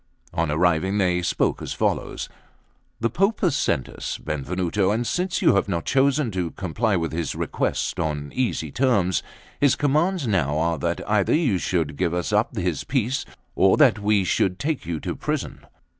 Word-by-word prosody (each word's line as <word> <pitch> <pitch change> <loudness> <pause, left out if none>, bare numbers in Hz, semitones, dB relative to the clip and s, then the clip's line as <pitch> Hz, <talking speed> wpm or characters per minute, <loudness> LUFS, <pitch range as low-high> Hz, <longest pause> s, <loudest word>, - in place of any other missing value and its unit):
On 85 -2 0
arriving 90 +5 +2
they 90 -3 +2
spoke 85 - 0
as - - -4
follows: - - -1 0.7
The 115 - +1
Pope 195 - +1
hath 180 -7 +2
sent 65 - 0
us. - - -5
Benvenuto; 90 +6 -1
and 115 +4 0
since 180 +7 -1
you - - +6
have 100 0 +1
not 85 -3 -2
chosen 135 -1 +2
to 90 -3 -2
comply 95 +6 -1
with 80 -2 -1
his 80 -2 -3
request - - -2
on 75 -2 -2
easy 115 - -1
terms, 100 - +2 0.4
his 140 -2 +4
commands 155 +4 +1
now 75 - +1
are 85 0 0
that 85 0 -2
either 105 -2 +2
you 130 - +2
should 80 -6 -1
give 85 - 0
us 90 +4 -2
up 110 +3 +1
his 90 -4 -1
piece, 130 -2 -1 0.3
or 95 0 +4
that 130 -8 +5
we 105 -1 +2
should 90 +1 +1
take 145 - -2
you 85 -2 -2
to - - -3
prison." - - -4
95 Hz, 175 wpm, -24 LUFS, 85-130 Hz, 0.7 s, you